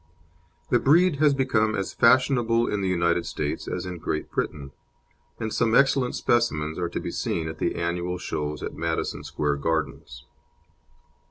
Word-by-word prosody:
The 120 - +5
breed 160 +5 +4
has 145 -1 +4
become 110 -5 +1
as 95 -2 -3
fashionable 120 -1 +3
in 105 - -1
the 95 - 0
United 85 -1 +1
States 75 -1 -3
as - - -3
in 90 -2 -6
Great 75 0 -3
Britain, 70 -2 -3 0.7
and 110 -1 -3
some 115 0 +2
excellent 135 -2 +3
specimens 80 -10 0
are 85 -1 -1
to - - -4
be - - -5
seen 80 -2 -2
at 80 - -7
the - - -1
annual 85 +1 -2
shows 75 -3 -4
at - - -4
Madison - - -3
Square 75 -1 -1
Gardens. 75 -5 -3
95 Hz, 160 wpm, -25 LUFS, 80-120 Hz, 0.7 s, The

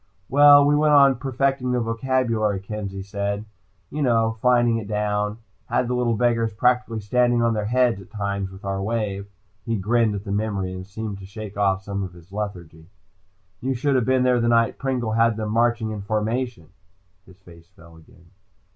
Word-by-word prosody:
"Well, 145 +1 +7
we 145 +1 +3
went 150 0 +4
on 140 -2 +6
perfecting 135 0 -1
the 125 - +1
vocabulary," 115 -3 0
Kenzie 100 -1 -6
said. 100 +1 -3 0.5
"You 150 - -3
know. 115 -4 +1
Fining 120 -2 +3
it 110 -3 -6
down. 105 0 -1 0.3
Had 125 - 0
the 125 - -1
little 120 -2 +1
beggars 115 0 +1
practically 125 0 +1
standing 120 +3 +2
on 115 -1 +2
their 105 -1 -2
heads 120 -3 +2
at 95 - -15
times 100 -2 -3
with 95 +1 -12
our 95 0 -2
wave." 100 -2 -2 0.4
He 115 - -2
grinned 110 +2 +1
at 100 - -5
the 100 - -6
memory 100 -3 -2
and 95 0 -8
seemed 105 0 -6
to 95 - -10
shake 105 0 -8
off 95 -1 +1
some 100 0 -4
of 95 -2 -5
his 85 +1 -17
lethargy. 90 -6 -6 0.7
"You 130 +1 -1
shoulda 130 +1 +1
been 130 +1 +2
here 125 -1 +3
the 115 - +1
night 115 -1 +2
Pringle 130 -4 -2
had 115 0 +2
them 110 -1 -3
marching 115 -1 +1
in 105 -2 -5
formation." 110 -2 -2 0.6
His 95 - -17
face 85 -3 -17
fell 85 -2 -18
again. 85 +1 -20
110 Hz, 185 wpm, -23 LUFS, 100-125 Hz, 0.7 s, Well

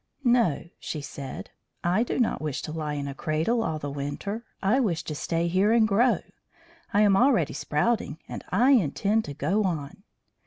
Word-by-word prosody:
"No," 235 - +2
she 155 - -4
said; 140 -1 -7 0.3
"I 180 +5 +2
do 240 - -1
not 240 -3 +1
wish 150 -3 -3
to - - -5
lie 155 -2 -3
in 140 -1 -3
a 140 - -4
cradle 160 - 0
all 160 -8 -1
the 145 -2 -5
winter. 145 +11 -4 0.2
I 210 +7 +2
wish 190 -11 0
to 155 - -5
stay 165 +3 -1
here 190 +5 +3
and 225 -1 +5
grow. 225 +5 +3 0.7
I 205 - +3
am 205 -2 +5
already 235 - +3
sprouting, 160 0 0
and - - -7
I 245 +8 +4
intend 215 - +2
to 145 - -7
go 195 +11 +1
on." 160 -3 -3
185 Hz, 185 wpm, -26 LUFS, 150-225 Hz, 0.7 s, and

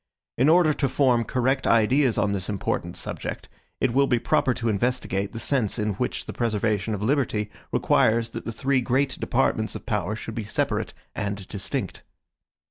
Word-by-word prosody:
In 130 +5 +3
order 165 -2 +5
to 140 -2 0
form 125 -4 +3
correct 130 +3 0
ideas 120 +3 +3
on 100 - +2
this 95 -1 -3
important 100 -3 -2
subject, - - -5 0.3
it 130 -3 +1
will 140 +2 +4
be 125 - +3
proper 130 +3 +2
to 120 -1 -2
investigate 100 -3 0
the 115 - -7
sense 115 -3 0
in 105 -2 0
which 125 +6 -3
the - - -6
preservation 110 -2 0
of 100 - -5
liberty 110 -5 0 0.2
requires 115 +1 +2
that - - -6
the 115 - -3
three 130 +3 +1
great 130 +3 0
departments 115 -3 0
of - - -7
power 105 -2 -1
should 115 +1 -7
be 115 - -3
separate 105 - -1 0.2
and 100 -1 -4
distinct. 100 -2 -4
115 Hz, 175 wpm, -25 LUFS, 105-130 Hz, 0.3 s, order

